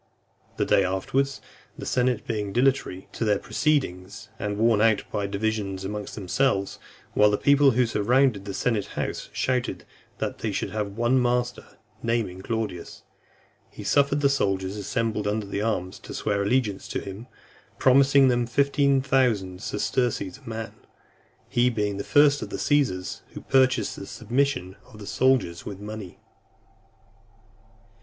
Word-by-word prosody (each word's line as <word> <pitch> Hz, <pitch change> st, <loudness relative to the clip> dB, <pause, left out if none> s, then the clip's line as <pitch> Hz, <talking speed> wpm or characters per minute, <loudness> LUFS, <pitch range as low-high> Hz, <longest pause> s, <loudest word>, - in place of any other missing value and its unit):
The -, -, +1 dB
day 100 Hz, -, +4 dB
afterwards, 130 Hz, +9 st, -1 dB, 0.4 s
the -, -, -7 dB
senate 125 Hz, -2 st, 0 dB
being 105 Hz, -3 st, -2 dB
dilatory 125 Hz, -7 st, +1 dB
in 115 Hz, -, +1 dB
their 105 Hz, -1 st, +3 dB
proceedings, 110 Hz, -, -1 dB
and 105 Hz, 0 st, -2 dB
worn 110 Hz, -1 st, +3 dB
out 110 Hz, -1 st, +3 dB
by 100 Hz, -1 st, -1 dB
divisions 100 Hz, -2 st, -2 dB
amongst 105 Hz, +1 st, -5 dB
themselves, 100 Hz, +1 st, 0 dB, 0.3 s
while 105 Hz, 0 st, +5 dB
the 105 Hz, -, +1 dB
people 140 Hz, +2 st, +5 dB
who 125 Hz, -, +4 dB
surrounded 115 Hz, -1 st, +2 dB
the 100 Hz, -, -5 dB
senate 110 Hz, -3 st, 0 dB
house -, -, -3 dB
shouted 125 Hz, -1 st, -1 dB, 0.3 s
that -, -, -3 dB
they -, -, -2 dB
would -, -, -4 dB
have 105 Hz, -1 st, -4 dB
one 120 Hz, +2 st, +3 dB
master, 125 Hz, 0 st, -1 dB, 0.2 s
naming 115 Hz, -6 st, -1 dB
Claudius, 110 Hz, -5 st, -4 dB, 0.7 s
he -, -, -10 dB
suffered 140 Hz, +1 st, +2 dB
the 140 Hz, -, +5 dB
soldiers 95 Hz, -7 st, 0 dB
assembled 105 Hz, +1 st, -2 dB
under 105 Hz, -1 st, -2 dB
arms 95 Hz, -5 st, -2 dB
to -, -, -9 dB
swear 100 Hz, -2 st, 0 dB
allegiance 105 Hz, -1 st, 0 dB
to -, -, -3 dB
him, 100 Hz, +5 st, -8 dB, 0.5 s
promising 135 Hz, +1 st, +5 dB
them 120 Hz, -2 st, +1 dB
fifteen 140 Hz, +1 st, +2 dB
thousand 110 Hz, -9 st, +1 dB
sesterces 110 Hz, 0 st, -1 dB
a 120 Hz, -, -9 dB
man; 115 Hz, 0 st, -5 dB, 0.7 s
he 120 Hz, +1 st, +2 dB
being 105 Hz, -4 st, -1 dB
the 100 Hz, -, -3 dB
first 145 Hz, 0 st, +4 dB
of -, -, -5 dB
the -, -, -4 dB
Caesars 125 Hz, -12 st, 0 dB
who -, -, -6 dB
purchased 130 Hz, -4 st, +2 dB
the 100 Hz, -, -8 dB
submission 115 Hz, -5 st, -1 dB
of 105 Hz, -, -16 dB
the 105 Hz, -, -9 dB
soldiers 100 Hz, -4 st, +1 dB
with 100 Hz, -2 st, -7 dB
money. 105 Hz, -2 st, -8 dB
110 Hz, 150 wpm, -25 LUFS, 100-130 Hz, 0.7 s, while